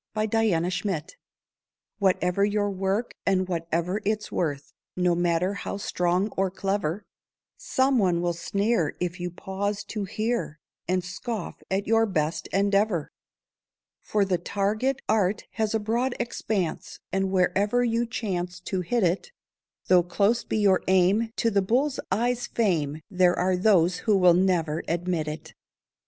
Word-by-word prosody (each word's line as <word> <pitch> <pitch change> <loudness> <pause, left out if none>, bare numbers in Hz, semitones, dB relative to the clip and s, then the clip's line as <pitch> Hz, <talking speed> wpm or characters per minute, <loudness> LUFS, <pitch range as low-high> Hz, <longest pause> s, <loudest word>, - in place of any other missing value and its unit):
NEVER 215 -4 +2 0.2
MIND 185 -7 -3 0.9
Whatever 185 -1 +2
your 205 0 +1
work 195 +4 -1
and 185 -1 +1
whatever 170 +2 -1
its 215 +1 -2
worth, 145 -5 -2 0.2
No 180 -1 +2
matter 175 +2 +1
how 200 0 -5
strong 180 0 0
or 195 -1 0
clever, 195 -1 -2 0.5
Some 260 -1 +1
one 180 -4 +2
will 175 0 0
sneer 200 0 0
if 180 0 -3
you 175 0 -3
pause 200 +3 -3
to 210 -3 -3
hear, 215 -5 -2 0.3
And 185 0 +1
scoff 210 +5 -5
at 195 +2 0
your 225 +1 +3
best 160 -4 -1
endeavour. 200 -4 +1 0.9
For 205 -2 +1
the 185 -2 0
target 215 +9 -1
art 205 -1 +1
has 220 0 -1
a - - +2
broad 235 +4 -1
expanse, 215 -7 -3
And 195 0 0
wherever 195 +5 +2
you 235 0 +1
chance 180 -6 -3
to 185 0 -2
hit 220 +6 0
it, 180 - 0 0.5
Though 180 -1 +5
close 200 +6 +1
be - - -2
your 200 -3 +4
aim 190 +5 +3
to 230 - +1
the 200 -1 +3
bull's 255 +8 +1
eye 235 +6 +2
fame, 175 -11 -1
There 180 -1 +3
are 185 +1 +2
those 180 -2 +3
who 210 -3 +2
will 180 -2 +6
never 170 -4 +1
admit 170 -1 -1
it. 150 +1 -7
195 Hz, 145 wpm, -26 LUFS, 180-215 Hz, 0.9 s, will